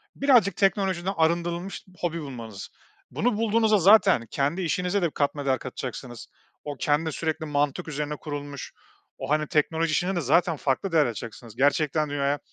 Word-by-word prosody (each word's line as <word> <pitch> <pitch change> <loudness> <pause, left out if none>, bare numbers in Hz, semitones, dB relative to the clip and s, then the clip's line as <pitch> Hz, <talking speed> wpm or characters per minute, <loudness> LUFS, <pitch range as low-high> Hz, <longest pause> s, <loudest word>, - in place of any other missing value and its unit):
birazcık 240 -10 +4
teknolojiden 195 -1 +1
arındırılmış 170 +3 0 0.2
hobi 170 -1 -2
bulmanız. 115 -8 -8 0.4
Bunu 230 -1 0
bulduğunuzda 220 -1 +3
zaten 195 - +5
kendi 145 +7 0
işinize 180 +3 0
de 170 - +1
katma 145 0 -1
değer 130 -1 +1
katacaksınız, 125 -2 -7 0.4
o 145 -1 -5
kendi 155 +2 +1
sürekli 160 +1 -3
mantık 145 0 -1
üzerine 150 0 -3
kurulmuş, 145 -2 -7 0.5
o, - - -6
hani, 155 0 +1
teknoloji 160 +2 +1
işinde 180 +5 0
de 175 - 0
zaten 165 +4 +2
farklı 135 +8 -1
değer 160 -3 +4
açacaksınız. 115 -1 -7
Gerçekten 150 +3 +2
dünyaya 145 0 0
155 Hz, 150 wpm, -26 LUFS, 140-180 Hz, 0.5 s, zaten